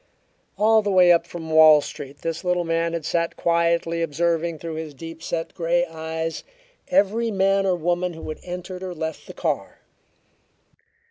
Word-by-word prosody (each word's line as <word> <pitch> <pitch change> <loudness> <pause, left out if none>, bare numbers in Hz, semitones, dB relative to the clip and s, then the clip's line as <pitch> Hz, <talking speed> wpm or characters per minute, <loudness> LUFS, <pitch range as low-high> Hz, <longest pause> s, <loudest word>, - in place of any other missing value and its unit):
All 220 +1 +4
the 205 - -2
way 180 -2 +6
up 170 0 +3
from 160 -2 -7
Wall 155 -1 +8
Street 140 -1 -8
this 165 +1 -3
little 180 -1 +1
man 165 0 0
had 165 -2 -3
sat 170 +1 -1
quietly 170 0 +1
observing 165 +1 0
through 165 +1 -6
his 155 -2 -6
deep 165 +2 -9
set 165 0 -4
grey 175 0 +1
eyes 160 0 -5 0.4
every 230 -2 +2
man 195 -1 +2
or 185 - +2
woman 175 +1 -1
who 160 - -9
had 155 - -6
entered 180 +1 -7
or 185 -1 -5
left 160 0 -5
the - - -9
car. - - -3
170 Hz, 165 wpm, -23 LUFS, 160-180 Hz, 0.4 s, Wall